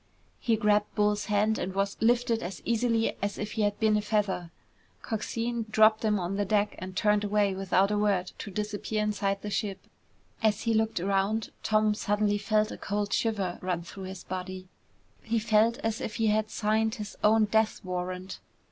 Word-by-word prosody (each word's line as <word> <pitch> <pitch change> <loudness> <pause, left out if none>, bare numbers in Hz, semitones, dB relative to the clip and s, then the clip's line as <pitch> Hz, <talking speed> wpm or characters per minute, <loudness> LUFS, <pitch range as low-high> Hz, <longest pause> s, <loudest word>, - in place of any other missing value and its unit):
He 230 - +2
grabbed 210 -1 +1
Bull's 210 0 +1
hand 210 +1 +1
and 185 +1 -3
was 195 0 0
lifted 235 0 +2
as 180 +2 -6
easily 230 -1 +1
as 200 +1 -2
if 210 0 -4
he 220 - -2
had 205 -1 0
been 220 -1 +3
a 210 - +2
feather. 210 -5 -1 0.5
Coxine 230 +1 -3
dropped 220 0 +5
him 210 -2 +2
on 180 +2 -2
the 205 - +1
deck 205 +1 +1
and 185 0 -7
turned 210 0 +3
away 205 -1 +2
without 195 +1 +2
a 210 - +1
word 195 -3 +1
to - - -6
disappear 210 +1 -2
inside 200 -2 -1
the 210 - -4
ship. 195 -2 -2 0.6
As 215 -2 +2
he 230 - +1
looked 220 -3 +1
around, 195 +4 0
Tom 215 0 +2
suddenly 205 0 0
felt 215 +1 +1
a - - -8
cold 205 0 -2
shiver 200 -6 0
run 180 -2 -2
through 190 +2 -9
his 190 0 -8
body. 185 0 -6 0.5
He 230 0 -1
felt 220 +1 +3
as 225 0 -1
if 210 - -4
he 225 -1 +2
had 215 0 +1
signed 220 +1 0
his 210 -2 -7
own 215 +1 +5
death 220 +1 +1
warrant. 185 +1 -4
210 Hz, 185 wpm, -28 LUFS, 195-220 Hz, 0.6 s, dropped